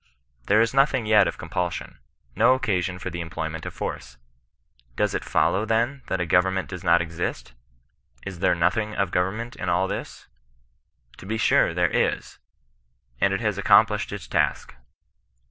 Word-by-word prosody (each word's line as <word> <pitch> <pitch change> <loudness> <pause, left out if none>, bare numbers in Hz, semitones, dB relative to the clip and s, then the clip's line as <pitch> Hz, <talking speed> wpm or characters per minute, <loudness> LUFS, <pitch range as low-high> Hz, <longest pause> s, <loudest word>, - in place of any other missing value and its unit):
There 105 +2 +5
is 115 +1 +1
nothing 135 -3 +2
yet 105 -2 +5
of - - -4
compulsion, 90 0 -4 0.4
no 130 - +5
occasion 90 -7 -1
for 90 +1 -6
the 85 +1 -4
employment 80 -1 -5
of - - -6
force. - - -6 0.8
Does - - 0
it - - -2
follow, 100 - +1
then, 115 +5 0
that 95 - -2
a 90 - 0
government 95 +2 +1
does 90 -1 -7
not 85 -1 +4
exist? 85 -6 -5 0.7
Is 95 -3 -7
there 90 - +2
nothing 105 +6 0
of 100 -3 -1
govern 90 +4 0
ment 115 +1 -6
in 95 - -3
all 90 +2 +1
this - - -6 0.5
% - - -32
To 95 - -11
be 110 +2 -2
sure - - +3
there 90 -2 +2
is, - - -1 0.8
and 95 - +3
it 95 - -1
has 105 -3 -1
ac - - -4
complished 105 0 +4
its 100 -4 -7
task. - - -1
95 Hz, 175 wpm, -24 LUFS, 85-110 Hz, 0.8 s, There